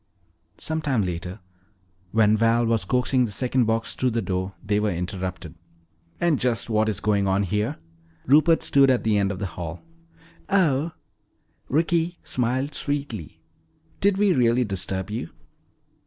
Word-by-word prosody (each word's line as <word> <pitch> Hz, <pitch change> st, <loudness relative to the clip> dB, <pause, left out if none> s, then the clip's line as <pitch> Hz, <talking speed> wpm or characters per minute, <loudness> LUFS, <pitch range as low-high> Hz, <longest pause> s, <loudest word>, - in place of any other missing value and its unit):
Some 160 Hz, 0 st, -2 dB
time 135 Hz, -8 st, +1 dB
later, 90 Hz, +3 st, -5 dB, 0.7 s
when 110 Hz, -1 st, +4 dB
Val 115 Hz, +2 st, +3 dB
was 115 Hz, -4 st, +1 dB
coaxing 125 Hz, +3 st, +2 dB
the 110 Hz, -, -5 dB
second 125 Hz, +4 st, +1 dB
box 115 Hz, +1 st, 0 dB
through 130 Hz, -, 0 dB
the 115 Hz, -1 st, -1 dB
door, 95 Hz, 0 st, -3 dB
they 105 Hz, 0 st, +1 dB
were 105 Hz, 0 st, +1 dB
interrupted. 90 Hz, -1 st, -4 dB, 0.7 s
"And 170 Hz, -5 st, +2 dB
just 120 Hz, -2 st, -1 dB
what 110 Hz, 0 st, +2 dB
is 105 Hz, -3 st, -1 dB
going 100 Hz, -2 st, +1 dB
on 95 Hz, +1 st, +2 dB
here?" 105 Hz, +2 st, -1 dB, 0.5 s
Rupert 155 Hz, +5 st, +4 dB
stood 140 Hz, -1 st, +5 dB
at 130 Hz, -2 st, +2 dB
the 105 Hz, -2 st, +2 dB
end 100 Hz, 0 st, +1 dB
of 95 Hz, -, -5 dB
the 100 Hz, -, -3 dB
hall. 85 Hz, 0 st, -6 dB, 0.7 s
"Oh," 165 Hz, -5 st, +2 dB, 0.8 s
Ricky 165 Hz, +3 st, +1 dB
smiled 130 Hz, +4 st, -1 dB
sweetly, 140 Hz, -, -4 dB, 0.6 s
"did 200 Hz, -1 st, +2 dB
we 200 Hz, -2 st, +3 dB
really 125 Hz, -2 st, +3 dB
disturb 95 Hz, -1 st, -2 dB
you?" 105 Hz, -6 st, -4 dB
115 Hz, 150 wpm, -24 LUFS, 100-135 Hz, 0.8 s, stood